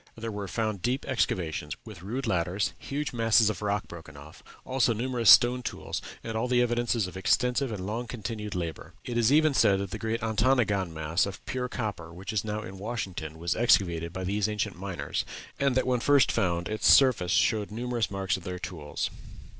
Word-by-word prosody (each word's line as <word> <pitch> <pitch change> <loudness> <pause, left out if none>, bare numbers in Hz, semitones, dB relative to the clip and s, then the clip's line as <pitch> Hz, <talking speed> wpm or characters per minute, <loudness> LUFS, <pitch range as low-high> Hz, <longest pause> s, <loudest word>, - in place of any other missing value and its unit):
There 115 0 -4
were 100 -1 -5
found 110 -2 -2
deep 125 +6 -1
excavations, 85 - -1
with 105 -6 -10
rude 120 +8 -4
ladders, 90 +3 0
huge 145 0 -4
masses 115 -2 +4
of - - -8
rock 100 -1 -1
broken 80 -3 -11
off, 75 +2 -13 0.2
also 130 -2 +2
numerous 120 -1 +1
stone 125 +1 +7
tools, - - -4 0.2
and 115 - -5
all 115 +3 0
the 125 -1 +2
evidences 120 -2 0
of 90 - -8
extensive 125 +7 +1
and 95 -4 -5
long 115 +4 -3
continued 110 -3 -5
labor. 85 -4 -5
It 120 - -4
is 120 +1 +3
even 155 0 +4
said 100 -6 +4
that 100 -1 -4
the - - -5
great 115 +1 -2
Ontonagon 110 -5 +2
mass 80 +4 0
of 100 - -8
pure 125 -1 -3
copper 105 -9 -4
which 90 +4 -7
is 105 - 0
now 105 0 -3
in 95 -1 -9
Washington 95 -8 -5
was 85 +1 -1
excavated 85 -8 +2
by 95 +1 -5
these 100 +3 0
ancient 105 -2 -2
miners, 90 -6 -3 0.4
and 140 -2 +2
that 130 - +2
when 125 -1 +1
first 140 +2 +4
found 85 -2 0
its 110 0 +3
surface 125 -10 +5
showed 105 0 +2
numerous 120 +1 -2
marks 95 0 -1
of 95 - -11
their 90 0 -5
tools. 80 -5 -4
105 Hz, 195 wpm, -28 LUFS, 90-120 Hz, 0.4 s, stone